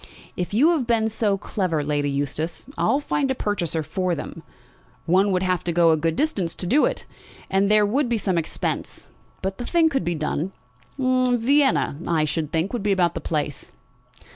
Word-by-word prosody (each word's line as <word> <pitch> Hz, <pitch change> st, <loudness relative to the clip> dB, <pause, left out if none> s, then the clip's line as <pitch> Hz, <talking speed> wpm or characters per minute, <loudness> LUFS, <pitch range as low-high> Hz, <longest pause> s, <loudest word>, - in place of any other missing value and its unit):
"If 180 Hz, -, -3 dB
you 255 Hz, +11 st, +4 dB
have 290 Hz, -8 st, 0 dB
been 225 Hz, -2 st, +2 dB
so 210 Hz, -2 st, 0 dB
clever, 180 Hz, -6 st, -2 dB
Lady 145 Hz, -1 st, 0 dB
Eustace, 145 Hz, +4 st, -3 dB
I'll 275 Hz, -, +2 dB
find 285 Hz, -1 st, -1 dB
a 265 Hz, -, 0 dB
purchaser 170 Hz, -, -1 dB
for 180 Hz, +3 st, -1 dB
them. 165 Hz, -, -7 dB, 0.6 s
One 190 Hz, +4 st, +3 dB
would 185 Hz, 0 st, +1 dB
have 185 Hz, -1 st, 0 dB
to 175 Hz, -, 0 dB
go 170 Hz, -1 st, +4 dB
a -, -, +4 dB
good 160 Hz, +1 st, -1 dB
distance 205 Hz, -, 0 dB
to -, -, -2 dB
do 270 Hz, +12 st, +4 dB
it, -, -, -3 dB, 0.5 s
and 195 Hz, +1 st, +2 dB
there 210 Hz, 0 st, +5 dB
would 250 Hz, +5 st, 0 dB
be 235 Hz, -, +1 dB
some 190 Hz, -3 st, -1 dB
expense. 165 Hz, -2 st, -3 dB, 0.3 s
But 190 Hz, +2 st, -3 dB
the 245 Hz, -, -4 dB
thing 335 Hz, -2 st, +3 dB
could 270 Hz, -3 st, -1 dB
be 175 Hz, -, -1 dB
done. 155 Hz, +4 st, -2 dB, 0.4 s
Vienna, 255 Hz, -, +2 dB
I 160 Hz, -2 st, +2 dB
should 155 Hz, 0 st, -2 dB
think, 165 Hz, +6 st, -1 dB
would 240 Hz, -, -2 dB
be 205 Hz, 0 st, 0 dB
about 175 Hz, -3 st, +2 dB
the -, -, -5 dB
place." 150 Hz, -3 st, -3 dB
190 Hz, 190 wpm, -23 LUFS, 165-240 Hz, 0.6 s, there